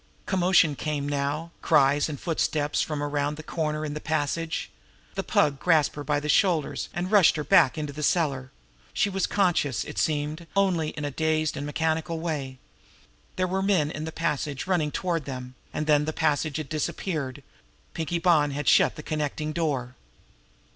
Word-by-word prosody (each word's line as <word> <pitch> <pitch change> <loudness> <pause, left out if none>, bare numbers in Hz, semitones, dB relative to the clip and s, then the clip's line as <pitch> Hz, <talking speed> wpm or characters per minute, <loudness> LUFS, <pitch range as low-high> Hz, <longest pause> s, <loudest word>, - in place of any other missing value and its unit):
Commotion 180 -5 +3
came 145 -1 -2
now; 145 +3 -2
cries 145 -1 +3
and 145 -3 -5
footsteps 155 -3 0
from 150 -2 -2
around 145 0 -1
that 155 - -9
corner 155 -2 -2
in 145 - -4
the 150 - -4
passage. 160 +2 -2 0.4
The - - -2
Pug 140 -2 +1
grasped 160 -4 +3
her 145 - -5
by 145 +1 0
the 150 - -5
shoulders, 165 -1 +1
and 180 +2 -3
rushed 205 -5 +6
her 150 - -2
back 130 -2 +5
into 150 -2 -4
the 150 - -6
cellar. 140 -5 +1 0.4
She 200 - +1
was 195 -1 0
conscious, 175 - +1
it - - -6
seemed, 155 +2 -1
only 180 -6 +2
in 150 -1 -5
a 145 - -2
dazed 155 +1 0
and 145 +1 -4
mechanical 160 +2 -1
way. 145 -6 -3 0.8
There 185 - +1
were 190 +1 -1
men 185 -7 +2
in 155 0 -5
the 160 - -5
passage 150 -4 -2
running 175 -5 +1
toward 170 -1 -2
them 125 -2 -6 0.2
and 155 - -2
then 150 -1 +3
the 155 - -2
passage 155 -1 0
had 155 -3 -4
disappeared. 155 -3 -3 0.5
Pinkie 165 0 -2
Bonn 165 -4 +3
had 145 0 -4
shut - - +5
the 150 - -8
connecting 150 0 -2
door. 140 -7 -1
155 Hz, 175 wpm, -26 LUFS, 145-165 Hz, 0.8 s, rushed